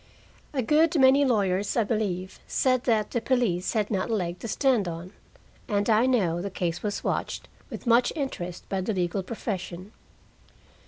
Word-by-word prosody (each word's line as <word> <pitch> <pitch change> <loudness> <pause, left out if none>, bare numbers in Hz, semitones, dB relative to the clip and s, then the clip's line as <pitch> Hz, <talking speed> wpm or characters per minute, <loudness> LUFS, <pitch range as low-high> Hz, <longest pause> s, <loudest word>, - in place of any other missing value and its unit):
A 265 -4 -1
good 310 +5 +3
many 265 +2 +6
lawyers, 200 -5 +1
I 230 - +4
believe, 200 -4 -2
said 255 -1 +1
that 220 -4 +1
the 235 - -1
police 225 -10 +1
had 215 -2 0
not 195 +2 -1
a 225 - +1
leg 180 -3 -3
to 230 - -6
stand 240 -4 +2
on, 170 +3 -6 0.5
and 205 -4 0
I 220 +4 +4
know 180 -10 +1
the 200 - -3
case 175 -3 -2
was 205 -1 -3
watched - - -2 0.2
with - - -8
much 240 +1 +4
interest 180 - -4
by 195 -1 -1
the 215 +4 -1
legal 180 0 -1
profession. 190 -2 -5
210 Hz, 170 wpm, -26 LUFS, 185-245 Hz, 0.5 s, many